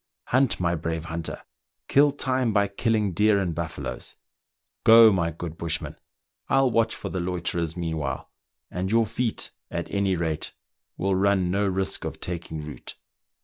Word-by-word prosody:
Hunt, 130 -1 +3
my 85 -1 +1
brave 80 0 -3
hunter! 85 -1 -5 0.4
kill 145 +1 +5
time 130 -4 0
by 100 -1 +3
killing 105 0 0
deer 105 +2 +4
and 90 -4 0
buffaloes! 80 -1 -5 0.7
Go, 115 -1 +9
my 85 -3 +1
good 85 0 -7
bush 85 -1 0
man; - - -7 0.5
I'll 135 -2 +4
watch 115 0 +2
for - - -6
the 95 - -3
loiterers 85 -2 -2
meanwhile, 80 -6 -3 0.4
and 90 +2 -2
j^ourfeet, 115 +1 0 0.2
at - - -4
any 100 -2 +2
rate, 80 -3 -2 0.4
will 95 0 +1
run 95 -1 +2
no 100 +1 +1
risk 95 0 -1
of - - -5
taking 85 -3 -4
root." 75 0 -8
95 Hz, 150 wpm, -26 LUFS, 85-110 Hz, 0.7 s, Go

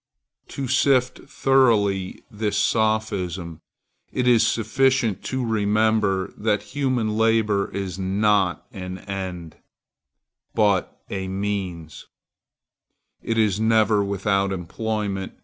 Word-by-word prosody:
To 135 -2 -5
sift 130 0 +2
thoroughly 105 -8 +2
this 105 -1 -2
sophism, 100 -6 -1 0.5
it 125 -1 -1
is 120 -3 +5
sufficient 115 -1 +1
to 130 -1 -2
remember 105 -2 +1
that 105 -1 0
human 130 -6 0
labor 110 -3 +2
is 95 -2 -5
not 95 -1 +1
an 95 -4 -6
end, 95 -4 -6 1.0
but 105 -4 +1
a 95 -1 -3
means. 95 -5 -4 1.2
_It 115 - -1
is 105 -3 +2
never 110 -2 +3
without 100 0 0
employment. 100 +2 -3
105 Hz, 95 wpm, -23 LUFS, 95-110 Hz, 1.2 s, is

